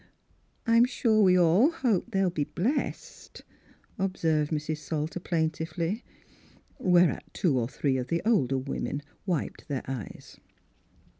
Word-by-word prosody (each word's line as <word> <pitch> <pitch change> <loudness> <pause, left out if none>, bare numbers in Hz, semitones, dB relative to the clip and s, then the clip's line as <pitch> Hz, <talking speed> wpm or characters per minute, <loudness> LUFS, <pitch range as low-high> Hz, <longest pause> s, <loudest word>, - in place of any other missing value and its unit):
" - - -40
I'm 230 0 +5
sure 230 -3 +2
we 185 -2 +5
all 180 - +5
hope 245 - 0
they'll 195 -4 +1
be 150 -4 -1
blessed," 245 - -3 0.6
observed 160 -6 0
Mrs. 155 0 -2
Salter 155 +2 -3
plaintively. 165 +4 -2 0.8
Whereat 180 -6 +3
two 145 -8 +1
or 115 0 -2
three 135 -1 0
of 125 -1 -3
the 170 0 -1
older 135 - +2
women 140 +2 -3 0.2
wiped 175 -6 -2
their 140 -3 -3
eyes. 130 -6 -7
170 Hz, 130 wpm, -28 LUFS, 150-195 Hz, 0.8 s, I'm